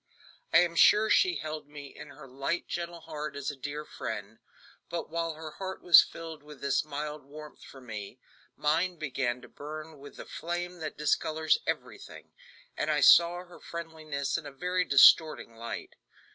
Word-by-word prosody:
I - - +6
am 170 -1 0
sure 215 +5 +6
she 370 -2 +4
held 155 -1 -5
me 145 -1 -11
in 150 - -10
her 145 0 -13
light, 135 +6 -3
gentle 170 -1 -5
heart 150 -2 -6
as 140 0 -3
a - - -10
dear 145 +3 -6
friend, 110 -4 -6 0.5
but 170 -2 -5
while 165 -1 -2
her 155 0 -8
heart 190 +3 -7
was 175 -3 +9
filled 165 -2 -8
with 150 -1 -13
this 140 +1 +1
mild 150 0 -5
warmth 150 +2 -12
for 135 - -13
me, 110 -5 -8 0.4
mine 165 +5 +1
began 130 -5 -2
to - - -11
burn 155 +1 -9
with 145 +1 -12
the - - -9
flame 175 +1 -5
that 155 -2 -6
discolors 155 - +1
everything, - - -6 0.4
and - - -2
I - - +2
saw 175 +1 +6
her 175 - -15
friendliness 155 -3 -4
in 155 - -10
a - - -8
very 180 +6 -1
distorting 140 -2 +6
light. 115 +1 -7
155 Hz, 175 wpm, -29 LUFS, 140-170 Hz, 0.5 s, was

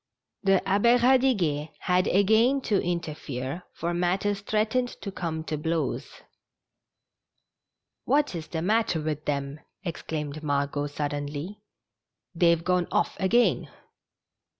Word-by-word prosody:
The 195 -1 +2
Abbe 205 +6 +4
Eadiguet 235 - +2
had 180 0 +2
again 220 +8 +4
to 205 -6 +1
interfere, 155 -4 -4
for 170 +1 -3
matters 190 +3 0
threatened 220 +4 +1 0.2
to 200 - -4
come 165 -4 -3
to 155 -2 -3
blows. 160 +1 -3 1.8
"What 290 -3 +2
is 160 -3 -5
the 160 -1 -3
matter 210 -3 +2
with 155 -1 -3
them? 140 0 -2
" - - -53
exclaimed 155 -4 -4
Margot^ 145 0 -1
suddenly. 145 +6 -4 0.4
" - - -61
They've 170 -1 +3
gone 180 -1 +1
off - - +1
again." 235 +6 +2
175 Hz, 120 wpm, -27 LUFS, 150-205 Hz, 1.8 s, Abbe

